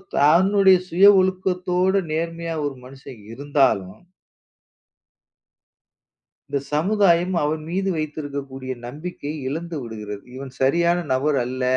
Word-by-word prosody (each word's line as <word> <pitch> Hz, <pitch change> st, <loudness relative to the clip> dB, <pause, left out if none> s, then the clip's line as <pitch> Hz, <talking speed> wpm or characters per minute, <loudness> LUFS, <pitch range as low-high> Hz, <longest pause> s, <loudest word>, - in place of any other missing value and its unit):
தன்னுடைய 190 Hz, +5 st, +5 dB
சுய 185 Hz, +4 st, +4 dB
ஒழுக்கத்தோடு 185 Hz, 0 st, +1 dB
நேர்மையான 165 Hz, -1 st, -3 dB
ஒரு 140 Hz, -2 st, -3 dB
மனுஷன் 130 Hz, -3 st, -12 dB
இருந்தாலும் 130 Hz, -8 st, 0 dB, 2.5 s
இந்தச் 140 Hz, -1 st, -3 dB
சமுதாயம் 180 Hz, +1 st, +2 dB
அவன் 155 Hz, +1 st, -1 dB
மீது 190 Hz, +2 st, -1 dB
வைத்திருக்கக்கூடிய 140 Hz, -4 st, -5 dB, 0.2 s
நம்பிக்கையை 150 Hz, +1 st, -6 dB
இழந்து 165 Hz, +2 st, -5 dB
விடுகிறது. 105 Hz, -3 st, -7 dB
இவன் 135 Hz, 0 st, -8 dB
சரியான 170 Hz, +6 st, +2 dB, 0.2 s
நபர் 140 Hz, +2 st, +1 dB
அல்ல. 130 Hz, +1 st, -4 dB
155 Hz, 95 wpm, -22 LUFS, 135-180 Hz, 2.5 s, தன்னுடைய